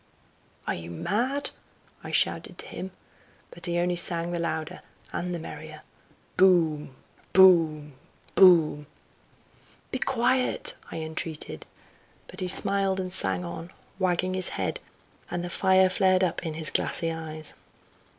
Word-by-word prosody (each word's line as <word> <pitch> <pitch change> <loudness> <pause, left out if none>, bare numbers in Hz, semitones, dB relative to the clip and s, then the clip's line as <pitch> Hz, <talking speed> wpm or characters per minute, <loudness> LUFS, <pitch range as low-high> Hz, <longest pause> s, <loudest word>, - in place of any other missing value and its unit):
"Are - - -1
you 85 0 -7
mad?" 245 - -1 0.5
I - - -7
shouted - - 0
to - - +1
him. 190 - -6 0.6
But 170 - -5
he 175 0 -1
only 175 +1 +1
sang 170 0 +2
the 175 - -2
louder 160 -2 -3 0.3
and 180 +1 -3
the 175 - -2
merrier, 155 -1 -9 0.5
"Boom! 160 -7 +3 0.4
boom! 165 -6 +5 0.4
boom!" 160 -6 +5 1.0
"Be 260 - -2
quiet!" 255 - +1 0.2
I - - -8
entreated. 160 -1 -4 0.6
But - - -12
he 185 - -2
smiled 195 +1 +1
and 185 -1 -4
sang 95 - 0
on, 85 - -7 0.3
wagging 185 0 +1
his 185 0 -1
head, - - -3 0.5
and 175 0 -3
the 175 - -5
fire 190 0 +4
flared 185 -1 +3
up 180 0 -1
in 155 - -4
his 160 -1 +2
glassy 165 -1 0
eyes. 155 -1 -6
175 Hz, 135 wpm, -27 LUFS, 155-185 Hz, 1.0 s, boom